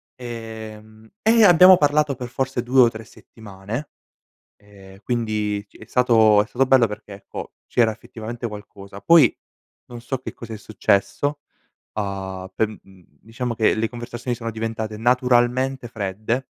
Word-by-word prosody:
ehm, 110 -2 -9
e 225 +1 +5
abbiamo 180 +1 +8
parlato 145 -1 +2
per 125 -1 -6
forse 130 -1 -2
2 130 +2 +4
o 120 - +6
3 110 -1 -10
settimane, 110 +7 -9 0.7
ehm, 100 -1 -17
quindi 105 -3 -2
ci - - -20
è 110 - -13
stato 110 -4 +4
è 105 - -8
stato 130 +3 +1
bello 130 -3 +5
perché, 105 0 -9
ecco, 100 - -9
c'era 115 -2 +2
effettivamente 115 +2 -7
qualcosa. 100 -1 -11
Poi 160 -2 +6 0.6
non 120 -1 -8
so 125 +3 -4
che 130 - -8
cos'è 115 -2 -9
successo, 110 +7 -1 0.5
uhm, 95 -2 -5
per, 110 - +1
mhmm, 95 -4 -15 0.2
diciamo 115 +2 -4
che 110 -1 +2
le 110 +1 -1
conversazioni 120 0 -5
sono 115 -1 -5
diventate 110 -1 -4
naturalmente 125 +1 +1
fredde 110 +4 -3
115 Hz, 145 wpm, -22 LUFS, 105-125 Hz, 0.7 s, abbiamo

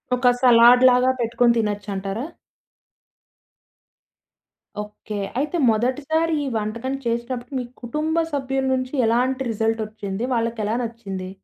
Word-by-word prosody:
ఒక 250 0 +1
సలాడ్‌లాగా 250 +1 +6
పెట్టుకొని 235 +1 +2
తినచ్చంటారా? 205 +1 -3 2.6
ఓకే. 210 0 -8 0.2
అయితే 300 +5 -1
మొదటిసారి 280 +9 0
ఈ - - -3
వంటకం 230 +5 -3
చేసినప్పుడు 240 +2 -3
మీ - - -3 0.2
కుటుంబ 310 +7 -1
సభ్యుల 270 -1 -1
నుంచి 255 +1 -2
ఎలాంటి 255 +3 +1
రిజల్ట్ 225 +1 0
ఒచ్చింది? 210 0 -5
వాళ్ళకెలా 230 -2 -1
నచ్చింది? 200 -5 -6
235 Hz, 100 wpm, -22 LUFS, 220-260 Hz, 2.6 s, సలాడ్‌లాగా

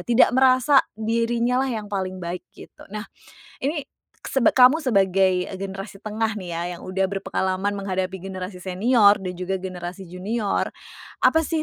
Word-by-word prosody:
Tidak 240 +1 +4
merasa 260 +2 +5 0.2
dirinya 235 +3 +1
lah 270 - 0
yang 210 -1 -7
paling 185 -1 -2
baik, 180 0 -5 0.2
gitu. - - -14
Nah, 210 +2 -6 0.6
ini 290 0 -2 0.4
seb 265 -4 +3
kamu 260 +5 +6
sebagai 190 -6 +2 0.2
generasi 195 +1 -7
tengah 220 0 -1
nih 185 -4 -6
ya, 170 0 -3 0.2
yang - - -14
udah 190 +1 0
berpengalaman 195 0 -2
menghadapi 190 -1 -2
generasi 185 0 -6
senior 200 +4 +4
dan 185 - -3
juga 185 +1 -3
generasi 180 0 -7
junior, 205 +4 -2 0.5
apa 320 - +5
sih 320 -2 -1
200 Hz, 150 wpm, -23 LUFS, 185-235 Hz, 0.6 s, kamu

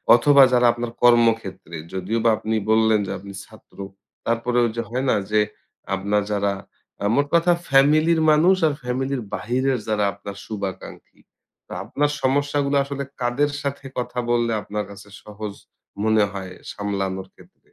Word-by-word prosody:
অথবা 140 +3 +6
যারা 125 0 +4
আপনার 120 0 -4
কর্মক্ষেত্রে, 115 -8 +2 0.2
যদিও 95 +5 -2
বা 115 - +5
আপনি 110 +1 -2 0.2
বললেন 110 -1 +4
যে, - - -4
আপনি 100 0 -10
ছাত্র, 110 0 -19 0.5
তারপরে 115 +1 0
ওই 115 - -1
যে, - - +1
হয় 130 +3 -2
না? - - +4 0.2
যে, 105 - +4 0.6
আপনার 100 +2 0
যারা 100 -1 0 0.5
আ - - 0
মোট 145 0 +2
কথা 170 +1 +4 0.2
ফ্যামিলির 155 +4 +4
মানুষ, 170 +5 +5
আর 145 - 0
ফ্যামিলির 130 +1 -2
বাহিরের 130 +2 0
যারা 105 -1 +1
আপনার 100 0 -9
শুভাকাঙ্ক্ষী, 100 -3 -7 0.5
তো - - -18
আপনার 145 0 0
সমস্যাগুলা 145 +1 +1
আসলে 140 0 -4 0.2
কাদের 135 +4 +1
সাথে 140 -1 -4
কথা 125 0 -3
বললে 120 -1 +1
আপনার 105 +1 -4
কাছে 100 +1 -13
সহজ 105 -1 -7 0.5
মনে 110 -1 +3
হয়, 95 -1 -6 0.2
সামলানোর 95 -2 -3
ক্ষেত্রে? - - -20
115 Hz, 150 wpm, -22 LUFS, 105-135 Hz, 0.6 s, অথবা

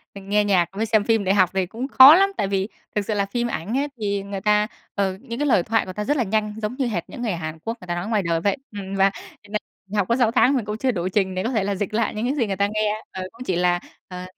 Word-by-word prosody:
mình 195 0 -10
nghe 210 +1 +3
nhạc 185 -4 +2
với 205 +3 -2
xem 220 -2 +2
phim 225 -1 +2
để 190 - +2
học 185 -3 +4
thì 190 -1 +1
cũng 230 +8 -5
khó 275 +2 +9
lắm. 390 +2 +4
Tại - - 0
vì 195 0 -1 0.3
thực 205 -1 0
sự 215 - -1
là 200 -1 +1
phim 240 +4 -2
ảnh 220 +2 -3
ấy, 285 +1 0
thì 200 -2 -1
người 200 -1 -6
ta 210 0 +3 0.3
ờ, 195 -2 0
những 240 -1 -6
cái 295 - +1
lời 195 -10 +4
thoại 225 +3 +1
người 185 - -7
ta 210 - -3
rất 290 +7 0
là 250 - +2
nhanh, 210 0 -1
giống 215 +3 -3
như 270 - 0
hệt 190 -8 -2
những 255 - -8
người 230 -3 -1
Hàn 160 -2 -5
Quốc 230 +2 -4
người 180 - -11
ta 175 - -2
nói 175 +3 -4
ngoài 215 -3 +1
đời 165 -1 0
vậy. 200 +7 +1
Ừm, 195 -2 -6
và 195 0 +4 0.3
cho - - -17
nên 215 - 0 0.3
mình 205 +2 -4
học 200 -3 +1
có 235 - +2
6 240 -3 +2
tháng, 255 +2 +4
mình 245 -5 -1
cũng 210 0 -4
chưa 260 +3 +1
đủ 180 -5 -2
trình 190 -1 0
để 185 - -1
có 230 - -1
thể 220 -6 +1
là 200 0 -1
dịch 205 +2 -3
lại 225 0 0
những 215 +2 -2
cái 265 +3 0
gì 240 -7 0
người 195 - -2
ta 200 +1 +1
nghe, 215 0 0
ờ, 190 - -5
cũng 235 +2 -10
chỉ 185 - 0
là, 175 0 +2 0.3
ờ, 180 0 -7
205 Hz, 320 wpm, -23 LUFS, 190-230 Hz, 0.3 s, khó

